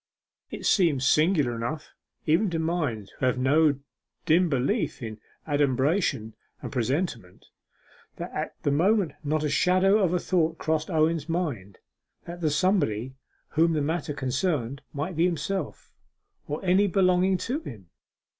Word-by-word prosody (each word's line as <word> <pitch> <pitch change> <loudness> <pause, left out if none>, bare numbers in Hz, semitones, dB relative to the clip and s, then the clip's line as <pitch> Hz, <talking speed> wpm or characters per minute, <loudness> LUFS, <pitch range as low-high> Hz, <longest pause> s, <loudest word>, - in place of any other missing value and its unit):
It - - -7
seems 160 -9 +3
singular 150 -4 +3
enough, 145 +7 -5 0.3
even 170 +7 +3
to 170 - -2
minds 160 - -2
who 130 - +1
have 125 - +1
no 145 +3 +3 0.5
dim 170 +2 +4
beliefs 135 -2 0
in 110 -1 -6 0.3
adumbration 140 - +1 0.3
and - - -7
presentiment, 125 - -2 0.7
that - - -6
at - - -4
that 145 - +1
moment 185 +3 +2
not 155 +1 0
the 150 - 0
shadow 185 +6 +3
of 185 -5 +2
a 180 - +2
thought 165 -3 0
crossed 155 +1 -1
Owen's 160 -1 +1
mind 135 - -3 0.5
that 175 +1 -8
the 155 - +2
somebody 145 - +1 0.4
whom 165 +1 +2
the 155 - 0
matter 155 -1 -2
concerned 135 -1 -1
might 155 +5 -4
be 165 +3 +3
himself, 180 +3 -3 0.5
or 150 +6 -4
any 190 +3 +4
belonging 185 0 +3
to 255 +10 -2
him. 105 - -11
155 Hz, 145 wpm, -26 LUFS, 135-180 Hz, 0.7 s, dim